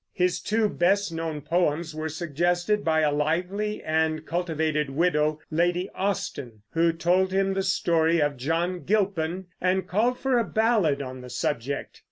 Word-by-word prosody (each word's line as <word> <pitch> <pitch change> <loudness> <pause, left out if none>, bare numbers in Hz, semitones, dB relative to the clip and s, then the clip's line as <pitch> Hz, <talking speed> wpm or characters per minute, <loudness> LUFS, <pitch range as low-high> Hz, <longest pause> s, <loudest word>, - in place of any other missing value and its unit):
His 180 -1 +1
two 220 0 +1
best 195 0 +1
known 160 -2 -4
poems 165 +1 0
were 155 +1 -3
suggested 175 +6 0
by 160 -1 +2
a 150 -1 +3
lively 180 +8 -1
and 155 0 0
cultivated 160 -4 -1
widow, 155 0 +1
Lady 175 +3 +1
Austen, 125 - -3
who 165 0 +3
told 180 +3 +1
him 195 0 +1
the 195 - 0
story 170 -3 +2
of 145 -1 +1
John 165 +7 -1
Gilpin 190 -3 0 0.2
and 185 0 +1
called 235 +7 +1
for 260 -2 +1
a - - +2
ballad 215 -12 +1
on 130 -1 -7
the 125 - -10
subject. 130 +3 -3
170 Hz, 155 wpm, -26 LUFS, 155-190 Hz, 0.2 s, a